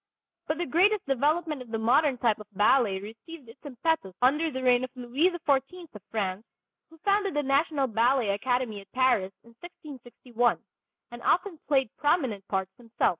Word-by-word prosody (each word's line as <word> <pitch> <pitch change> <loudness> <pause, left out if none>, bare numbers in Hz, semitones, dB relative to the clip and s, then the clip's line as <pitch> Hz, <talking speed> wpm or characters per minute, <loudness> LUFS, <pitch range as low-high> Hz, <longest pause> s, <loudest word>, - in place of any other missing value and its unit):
But 310 - -1
the 350 - -2
greatest 380 - +2
development 295 +2 0
of 250 - -11
the 225 - -2
modern 255 +5 +2
type 230 -4 +1
of 210 - -11
ballet 205 -1 +3
received 225 +8 -11
its 230 +4 -15
impetus 275 - -2
under 300 +6 +2
the 260 -3 -5
reign 250 0 +4
of 255 - -4
Louis 255 +8 +1 0.2
XIV 290 +5 -1
of 210 - -11
France, 200 -2 -3 0.5
who 325 - -18
founded 400 -2 +1
the 295 - +1
national 280 +1 +1
ballet 235 0 +1
academy 225 +1 -1
at 195 - -20
Paris 250 -7 +2
in 235 - -19
1661, 245 -7 -3 0.5
and 240 0 -9
often 360 - 0
played 265 -6 +1
prominent 260 - 0
parts 190 -1 -2
himself. 235 -2 0
255 Hz, 170 wpm, -27 LUFS, 225-300 Hz, 0.5 s, reign